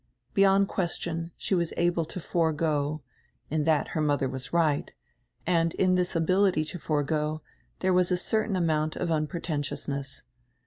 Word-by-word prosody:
Beyond 195 0 +5
question, 170 -3 -2
she - - -2
was 170 -3 +1
able 175 -1 +2
to 165 - -7
forego 155 -3 0 0.2
— - - -40
in 155 -1 +1
that 160 -2 +2
her 155 - -1
mother 145 -2 +1
was 130 0 -6
right 160 -4 +1 0.3
— - - -42
and 165 -2 +2
in 185 -1 +3
diis 180 0 0
ability 180 0 +3
to 180 - -5
forego 150 +1 -1 0.4
diere 185 0 +2
was 180 0 +3
a 180 - +2
certain 215 +2 0
amount 155 -3 +1
of 180 - -2
unpre 155 +1 -1
tentiousness. 140 -2 -3
165 Hz, 165 wpm, -28 LUFS, 150-180 Hz, 0.4 s, Beyond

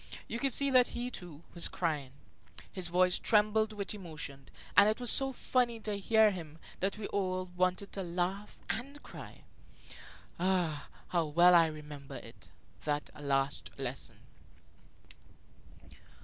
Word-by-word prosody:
You 235 - -4
could 275 +1 +1
see 280 +2 +2
that 255 -1 +6
he, 245 +1 -2
too, 170 -6 -9
was 170 - +4
crying; 150 -6 -2 0.6
his 185 -2 -1
voice 180 +1 +3
trembled 215 0 +3
with 205 -1 -3
emotion, 155 -8 -7 0.3
and 200 +1 +8
it 215 - -1
was 245 -1 +4
so 270 -1 +5
funny 245 -2 0
to 210 -2 -3
hear 220 +1 +5
him 165 -5 -8 0.2
that 195 +2 -1
we 215 - -5
all 185 -2 -2
wanted 185 +2 0
to 195 - -4
laugh 180 +3 -3
and 280 +5 -4
cry. - - -11 1.0
Ah, 175 -4 0 0.2
how 170 -2 +1
well 175 +4 +6
I 165 -2 +7
remember 150 -3 -8
it, - - -11 0.3
that 150 -1 -2
last 140 -1 -1
lesson! 135 -1 -4
185 Hz, 140 wpm, -32 LUFS, 160-215 Hz, 1.0 s, and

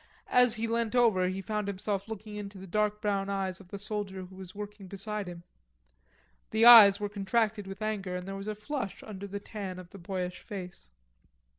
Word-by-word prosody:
As 250 -2 +5
he 225 0 -2
leant 230 0 0
over 220 -7 +4
he 190 +1 -3
found 210 -1 -2
himself 200 +1 -2
looking 215 -1 -7
into 200 -1 -7
the 190 - -9
dark 210 +2 0
brown 200 -1 0
eyes 190 -2 -2
of 195 - -14
the 200 - -6
soldier 200 -2 -4
who 185 - -15
was 185 0 -10
working 205 -1 -8
beside 200 +1 -4
him. 170 -1 -9 1.1
The 220 +1 +3
eyes 215 -4 +11
were 205 - -1
contracted 205 +1 0
with 195 +2 -6
anger 200 -4 -2
and 180 +1 -5
there 195 - -4
was 195 +1 -6
a 215 - -2
flush 220 -1 -4
under 200 -2 -7
the 200 +1 -5
tan 200 -3 -6
of 180 -1 -11
the 200 - -11
boyish 180 0 -4
face. 180 - -8
200 Hz, 200 wpm, -30 LUFS, 190-215 Hz, 1.1 s, eyes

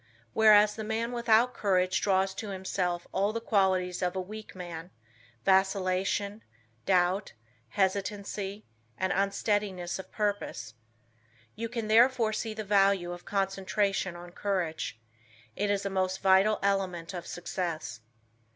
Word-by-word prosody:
Whereas, 210 -1 +6
the 220 - -5
man 225 +2 -2
without 235 0 +3
courage 185 -4 +1
draws 190 -1 +2
to 210 +2 -6
himself 185 -2 -2
all 200 +2 +1
the 230 - -3
qualities 190 -5 +1
of 180 0 0
a - - -1
weak 215 +3 -8
man, 175 -2 -7 0.6
vacillation, 195 +2 +1 0.5
doubt, 185 +1 +2 0.4
hesitancy, 200 - -2 0.3
and 190 0 0
unsteadiness 195 -2 -1
of 190 - -9
purpose. 205 - -2 0.8
You 230 +1 -4
can 230 -2 -3
therefore 230 0 +4
see 220 0 -3
the 215 - -4
value 195 -3 +3
of 175 0 -8
concentration 195 -1 0
on 175 0 -10
courage. 175 - -2 0.6
It 205 0 -1
is 200 0 0
a - - 0
most 190 0 0
vital 195 +3 +4
element 190 -4 -1
of 175 -2 -6
success. 175 -6 -4
195 Hz, 130 wpm, -29 LUFS, 185-210 Hz, 0.8 s, Whereas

